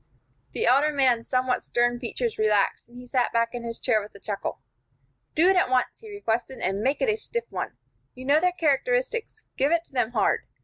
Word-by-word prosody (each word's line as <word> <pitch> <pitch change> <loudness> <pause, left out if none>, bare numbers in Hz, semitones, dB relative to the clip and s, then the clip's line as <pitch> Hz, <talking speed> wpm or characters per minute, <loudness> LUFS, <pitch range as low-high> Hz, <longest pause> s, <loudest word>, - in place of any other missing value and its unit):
The 455 - -1
elder 285 +4 +4
man's 255 -5 +2
somewhat 255 -1 +1
stern 240 0 +1
features 240 -2 -3
relaxed, 210 +1 +1
and 240 - -14
he 250 - -10
sat 250 0 0
back 230 0 +2
in 245 - -4
his 230 -1 -5
chair 220 -4 +2
with 205 0 -11
a - - -11
chuckle. 200 0 -4 0.8
"Do 330 +4 +5
it 380 - +5
at 360 - +3
once," 255 -1 +1
he 440 - -12
requested, 260 - -2
"and 195 +2 -1
make 270 - +1
it - - +2
a 430 - +1
stiff 470 +1 -4
one. - - -4 0.4
You 255 +1 -9
know 285 +3 +5
their 360 +2 +2
characteristics; 445 - 0
give 280 +3 +2
it 335 0 +2
to 300 - -22
them 245 -2 0
hard. 200 - +1
255 Hz, 215 wpm, -26 LUFS, 230-335 Hz, 0.8 s, Do